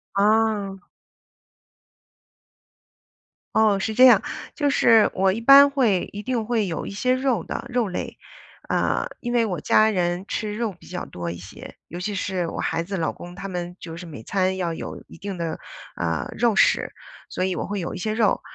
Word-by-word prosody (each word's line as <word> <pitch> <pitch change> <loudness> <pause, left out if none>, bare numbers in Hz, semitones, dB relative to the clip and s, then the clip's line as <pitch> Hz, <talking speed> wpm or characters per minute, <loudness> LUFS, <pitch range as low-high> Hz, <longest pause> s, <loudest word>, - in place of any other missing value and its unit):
啊。 205 -2 +1 2.7
哦， 215 -3 +4
是 220 +3 -2
这 255 +3 +7
样， 225 -5 +7 0.3
就 290 -2 0
是 230 -5 +5
我 190 0 +2
一 220 - -3
般 275 +4 +8
会， 235 -10 +1
一 205 - -6
定 235 -2 -2
会 225 -4 0
有 165 - -4
一 - - -6
些 250 +6 +1
肉 255 -7 0
的， - - -5
肉 245 -3 0
类， 180 - -5 0.5
呃， - - 0
因 240 - -3
为 235 -2 +3
我 180 -7 -3
家 215 0 +4
人 180 -1 -1
吃 210 -1 -3
肉 225 -4 -2
比 - - -17
较 180 0 -5
多 85 -1 -5
一 85 - -7
些， 90 +2 -11
尤 175 - -8
其 205 +3 -3
是 185 -2 -2
我 - - -6
孩 165 +1 -1
子 195 +2 -4
老 160 - -1
公 175 0 -10
他 195 +2 -7
们， 180 -1 -5
就 165 -1 -8
是 175 +1 -8
每 150 -9 -9
餐 190 -1 0
要 170 -3 -1
有 - - -7
一 - - -13
定 195 -1 -6
的， 165 -1 -3 0.4
呃， 80 -2 -2
肉 235 -1 +3
食， - - +3 0.4
所 185 - -1
以 185 -1 -1
我 - - -3
会 205 -1 -3
有 175 - -4
一 - - -5
些 215 +4 -2
肉， 220 -2 +2
200 Hz, 205 characters per minute, -23 LUFS, 180-225 Hz, 2.7 s, 般